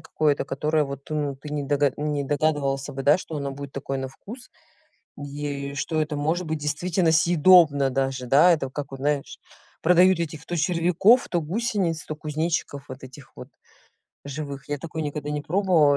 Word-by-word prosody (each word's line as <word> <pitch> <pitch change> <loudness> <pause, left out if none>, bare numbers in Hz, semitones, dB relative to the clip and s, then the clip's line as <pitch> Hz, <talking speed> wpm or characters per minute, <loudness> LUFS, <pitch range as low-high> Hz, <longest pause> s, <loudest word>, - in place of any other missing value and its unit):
какое-то, 150 -2 0
которое 150 +2 0
вот 140 -1 -6
ну 150 -2 -2
ты 150 +2 -10
не 145 -1 -3
догад 145 -1 +1
не 150 -1 -2
догадывался 145 -2 0
бы, 135 0 -5
да, 145 +4 +5
что 160 -4 -7
оно 140 -1 -3
будет 140 0 -8
такое 135 0 -4
на 135 0 -4
вкус. 235 - -12 0.7
Е 140 -1 -5
что 155 +2 -1
это 150 -1 -2
может 160 +4 -1
быть 155 0 -2
действительно 165 +4 0
съедобно 160 -4 +5
даже, 135 -1 -2
да. 150 +8 +6
Это 135 -5 -1
как 140 0 -6
вот 135 - -8
знаешь, 145 0 -2 0.4
продают 180 +1 +5
этих 155 -1 -5
то 175 - -3
червяков, 180 +8 +3
то 175 - 0
гусениц, 185 -3 -1
то 155 - -4
кузнечиков 150 -2 -3
вот 130 +1 -9
этих 130 0 -13
вот - - -10 0.8
живых. 140 0 -6
Я 145 -1 -2
такое 160 0 -6
никогда 150 0 -4
не 150 -1 -3
пробовала 165 -5 +3
150 Hz, 175 wpm, -24 LUFS, 140-165 Hz, 0.8 s, да